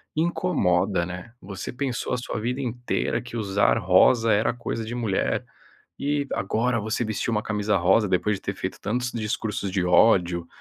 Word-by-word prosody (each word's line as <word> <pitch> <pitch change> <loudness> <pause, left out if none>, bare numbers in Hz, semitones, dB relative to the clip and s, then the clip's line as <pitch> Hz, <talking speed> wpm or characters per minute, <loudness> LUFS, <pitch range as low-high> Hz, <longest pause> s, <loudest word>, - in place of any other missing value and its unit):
incomoda, 105 - +1
né. 90 +6 -8
Você 95 +1 -6
pensou 130 -2 -2
a - - +1
sua 125 - -4
vida 125 +4 -2
inteira 120 -1 -2
que 120 -1 -7
usar 100 -2 +2
rosa 110 +5 +4
era 105 +2 +2
coisa 115 -1 -4
de 120 +2 -5
mulher, 110 -6 -1 0.5
e 145 0 -1
agora 115 +5 0
você 110 +3 -2
vestir 110 +2 -2
uma 105 -1 0
camisa 105 -1 0
rosa, 95 +5 +4
depois 100 +3 +1
de - - -13
ter 100 - -3
feito 95 0 -5
tantos 120 +4 -1
discursos 105 -3 -3
de 95 -1 0
ódio 90 -2 +4
110 Hz, 170 wpm, -25 LUFS, 95-120 Hz, 0.5 s, rosa